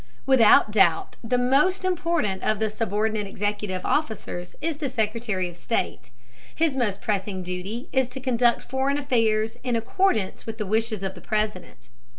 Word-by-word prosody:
Without 230 -5 +6
doubt 175 -6 +3
the 250 +2 +1
most 290 +10 +2
important 335 - 0
of 215 - +1
the 215 0 -1
subordinate 215 -1 -1
executive 205 -2 -3
officers 220 - -2
is 325 -2 -2
the 290 -3 -2
Secretary 215 -4 -1
of 175 - -10
State. 175 - -2 0.5
His 320 -4 +1
most 220 -7 -1
pressing 195 -2 -2
duty 185 - -5
is 265 -1 +3
to 255 +2 -8
conduct 245 -2 +2
foreign 265 +2 0
affairs 225 -5 +1
in 250 -2 0
accordance 230 - 0
with 225 0 -5
the 215 - -3
wishes 215 0 0
of 190 0 -2
the 180 - -12
President. 210 -4 -3
220 Hz, 160 wpm, -25 LUFS, 205-260 Hz, 0.5 s, Without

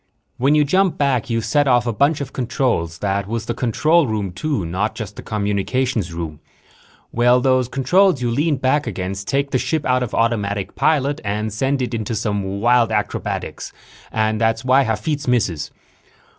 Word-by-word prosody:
When 140 +4 +3
you 150 - +5
jump 185 +5 +2
back, 135 -5 0
you 115 -1 0
set 140 +7 +1
off 120 -2 +3
a 120 - -1
bunch 145 +6 +2
of 135 -1 -6
controls. 125 - -1
That 100 0 -1
was 115 0 -3
the 120 - -2
control 150 +7 +2
room, 105 -4 -2
too, 100 - -2
not 95 +6 -2
just 105 -3 -6
the - - -8
communications 105 0 -1
room. 80 -3 -6 0.7
Well, 120 +1 +4
those 130 -1 +2
controls 145 +6 +3
you 120 -1 -1
lean 150 +5 +1
back 130 +2 +1
against 95 -1 -4
take 140 +1 0
the 130 - +1
ship 155 +2 -1
out 125 0 +2
of 125 - -3
automatic 105 -4 0
pilot 145 -1 +1
and 105 +1 -2
send 135 +4 0
it 125 - -4
into 110 0 -2
some 100 -2 -2
wild 120 0 +3
acrobatics 105 -1 -3 0.4
and 110 0 0
that's 115 +1 +1
why 130 +2 +5
Hafitz 130 +7 -2
misses. 100 -11 0
120 Hz, 175 wpm, -20 LUFS, 105-135 Hz, 0.7 s, you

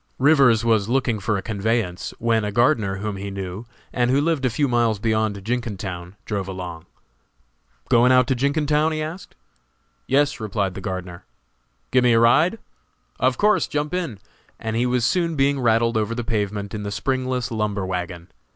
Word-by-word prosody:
Rivers 135 -5 +4
was 110 -2 +2
looking 125 -3 +1
around - - -10
for 105 -1 +1
a 95 - -5
conveyance, 110 -3 -2
when 115 -1 +1
a 105 - -2
gardener 115 -3 +2
whom 100 +1 -4
he 100 +1 -5
knew, 95 +3 -6 0.3
and 120 -1 +1
who 135 +2 +3
lived 150 -2 0
a - - +3
few 140 +5 0
miles 120 -3 +2
beyond 110 -2 -1
Jenkintown, 100 -7 -4
drove 100 -3 -3
along. 90 -4 -7 1.0
"Going 120 +2 +5
out 125 0 +5
to - - +4
Jenkintown?" 150 +4 +1
he 155 0 -2
asked. 170 +4 -8 0.7
"Yes," 145 +2 +2
replied 100 -3 -2
the 95 - -7
gardener. 95 -3 -5 0.7
"Give 130 -1 +4
me 120 -1 +4
a 115 - +5
ride?" 150 - +4 0.6
"Of - - +2
course; 210 +1 +3
jump 150 +1 -2
in." 170 - -2 0.4
And 110 -1 -3
he 120 +2 +1
was 125 -1 +1
soon 170 0 +1
being 140 0 +2
rattled 115 -1 +2
over 110 +1 -1
the 120 - -3
pavement 105 -2 -2
in 105 - -4
the 100 - -4
springless 130 +2 -2
lumber 105 -3 -1
wagon. 90 -1 -5
115 Hz, 180 wpm, -22 LUFS, 100-130 Hz, 1.0 s, Going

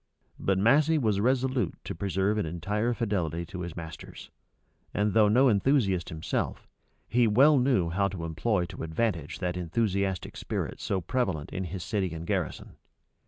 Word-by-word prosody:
But 95 -1 +1
Massey 145 +10 +4
was 110 -8 +1
resolute 130 +2 +1
to - - -5
preserve 100 +2 0
an 105 - 0
entire 105 +8 -1
fidelity 85 -8 -1
to 90 +2 -7
his 85 -2 -5
masters; 80 -1 -9 0.6
and 105 0 +1
though 110 -2 +5
no 125 +6 +5
enthusiast 100 - +2
himself, 80 0 -3 0.4
he 120 0 +3
well 135 +7 +6
knew 125 -10 +2
how 100 +3 +2
to 90 -4 -5
employ 90 +4 0
to 85 - -9
advantage 80 -2 -2
that 90 -2 -2
enthusiastic 95 +1 -1
spirit - - -4
so 95 - -1
prevalent 90 - -2
in 95 0 -2
his 90 +1 -5
city 95 -6 -1
and 80 +1 -6
garrison. - - -3
100 Hz, 160 wpm, -28 LUFS, 85-115 Hz, 0.6 s, well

